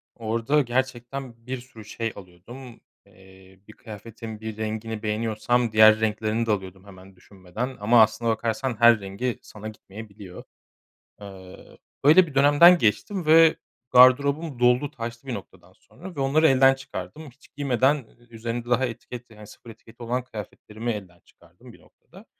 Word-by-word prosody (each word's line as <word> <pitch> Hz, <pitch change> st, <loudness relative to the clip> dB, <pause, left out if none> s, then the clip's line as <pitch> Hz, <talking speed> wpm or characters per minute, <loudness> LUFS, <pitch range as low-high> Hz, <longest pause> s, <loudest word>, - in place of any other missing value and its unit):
Orada 115 Hz, +6 st, 0 dB
gerçekten 125 Hz, -1 st, -4 dB
bir 130 Hz, +1 st, -3 dB
sürü 115 Hz, -4 st, -15 dB
şey 115 Hz, +1 st, -4 dB
alıyordum. 110 Hz, +7 st, -13 dB, 0.3 s
Eee, 95 Hz, 0 st, -20 dB
bir 110 Hz, -, -14 dB
kıyafetin 110 Hz, 0 st, -10 dB
bir 110 Hz, -1 st, -7 dB
rengini 110 Hz, 0 st, -5 dB
beğeniyorsam 115 Hz, +2 st, -1 dB
diğer 110 Hz, 0 st, +6 dB
renklerini 110 Hz, +1 st, -1 dB
de 115 Hz, -, -1 dB
alıyordum 95 Hz, -1 st, -5 dB
hemen 95 Hz, -1 st, -15 dB
düşünmeden 100 Hz, +7 st, -8 dB
ama 115 Hz, +3 st, +4 dB
aslına 110 Hz, +2 st, +1 dB
bakarsan 115 Hz, +3 st, -2 dB
her 115 Hz, -2 st, +6 dB
rengi 100 Hz, +6 st, -4 dB
sana 105 Hz, 0 st, -11 dB
gitmeyebiliyor. 105 Hz, -3 st, -11 dB, 0.8 s
Eee, 95 Hz, -2 st, -13 dB, 0.3 s
böyle 165 Hz, +6 st, +6 dB
bir 145 Hz, -, -12 dB
dönemden 145 Hz, +6 st, +6 dB
geçtim 155 Hz, -, -1 dB
ve 160 Hz, +1 st, +6 dB, 0.4 s
gardırobum 140 Hz, +3 st, +4 dB
doldu 125 Hz, +4 st, +2 dB
taştı 120 Hz, -1 st, -8 dB
bir 130 Hz, -, -4 dB
noktadan 100 Hz, -, -11 dB
sonra 180 Hz, +1 st, -14 dB
ve -, -, -7 dB
onları 145 Hz, +4 st, +3 dB
elden 135 Hz, -1 st, +5 dB
çıkardım. 135 Hz, +3 st, -9 dB
Hiç 140 Hz, +4 st, -23 dB
giymeden 135 Hz, 0 st, +1 dB, 0.2 s
ü 120 Hz, -, -24 dB
üzerinde 120 Hz, +1 st, -5 dB
daha 125 Hz, +2 st, +2 dB
etiket, 120 Hz, +1 st, -9 dB
yani, 105 Hz, -1 st, -14 dB
sıfır 120 Hz, -, -15 dB
etiketi 115 Hz, +1 st, -14 dB
olan 125 Hz, +2 st, -2 dB
kıyafetlerimi 110 Hz, 0 st, -7 dB
elden 95 Hz, -5 st, -8 dB
çıkardım -, -, -20 dB
bir -, -, -19 dB
noktada. -, -, -20 dB
115 Hz, 150 wpm, -24 LUFS, 105-130 Hz, 0.8 s, diğer